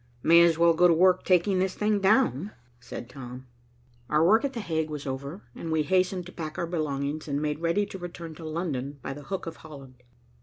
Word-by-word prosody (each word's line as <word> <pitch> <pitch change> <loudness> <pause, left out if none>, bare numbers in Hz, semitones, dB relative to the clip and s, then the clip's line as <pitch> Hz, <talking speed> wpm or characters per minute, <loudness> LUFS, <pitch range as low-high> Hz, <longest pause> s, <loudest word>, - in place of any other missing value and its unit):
"May 170 +1 +7
as 170 -2 +4
well 170 0 +5
go 180 +2 +5
to 170 - +5
work 185 +2 +4
taking 185 +1 +3
this 185 0 0
thing 210 -1 +1
down," 200 - +2 0.3
said 125 -1 -8
Tom. 125 0 -9 0.6
Our 155 +2 +3
work 220 +8 +5
at 280 -1 -1
The 235 - -4
Hague 160 -6 -2
was 150 -2 -6
over, 140 +7 -5
and 165 - -6
we 160 -1 +2
hastened 185 +1 +1
to 180 - -10
pack 155 -3 -6
our 170 - -1
belongings 155 -3 -3
and 140 -1 -1
made 150 0 -2
ready 170 +5 +1
to 195 -1 -9
return 170 -2 -7
to 165 - -10
London 155 -4 -3
by 135 - -4
the 145 - -9
Hook 195 -1 -4
of 165 -1 -7
Holland. 135 -5 -13
165 Hz, 220 wpm, -27 LUFS, 145-185 Hz, 0.6 s, May